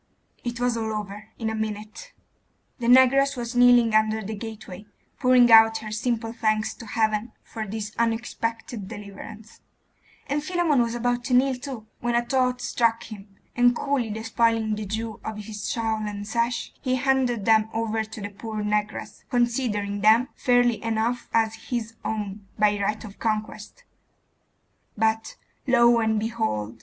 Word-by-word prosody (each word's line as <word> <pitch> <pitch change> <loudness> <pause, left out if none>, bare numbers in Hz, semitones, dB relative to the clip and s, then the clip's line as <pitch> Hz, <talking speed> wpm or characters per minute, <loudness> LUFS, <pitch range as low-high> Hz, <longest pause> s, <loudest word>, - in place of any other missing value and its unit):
It 240 0 -4
was 245 -1 +1
all 220 -1 -2
over 210 0 -6
in 225 - -3
a 220 - -1
minute.... 215 - -5 0.7
The 235 - -2
negress 260 +2 +5
was 240 0 -5
kneeling 245 -2 +6
under 215 0 +2
the 215 +3 -5
gateway, 210 -2 -8 0.3
pouring 250 -2 +5
out 225 0 +8
her 220 -1 -7
simple 225 +1 -2
thanks 215 -2 0
to 230 - -11
Heaven 220 +1 0
for 220 -1 -6
this 210 0 -5
unexpected 230 -2 -2
deliverance; 210 +1 -10 0.6
and 290 +1 -2
Philammon 335 -5 +2
was 235 0 -1
about 245 0 -1
to 255 - +2
kneel 265 +2 +4
too, 250 -3 -7
when 240 0 -1
a 240 0 +1
thought 250 -1 +1
struck 230 -1 +1
him; 200 -2 -11 0.2
and 245 0 +4
coolly 275 -5 -1
despoiling 225 0 0
the 210 -1 -4
Jew 220 +2 -4
of 220 -1 -5
his 210 0 -6
shawl 225 -2 -1
and 205 0 -6
sash, 235 +2 -1
he 255 -2 0
handed 255 -5 +1
them 220 -1 +4
over 225 -1 -1
to 220 0 -9
the 205 - -4
poor 215 +1 -5
negress, 210 0 -2
considering 230 -5 0
them 220 +4 +5
fairly 245 -3 +2
enough 225 +2 -1
as 225 -1 +2 0.2
his 230 -3 -3
own 205 -2 -4
by 210 -1 +2
right 210 +2 -1
of 205 -1 -12
conquest; 215 - -3 1.1
but, 220 +1 0 0.3
lo 235 -2 +5
and 220 -1 +1
behold! 210 - -3
225 Hz, 155 wpm, -25 LUFS, 215-240 Hz, 1.1 s, out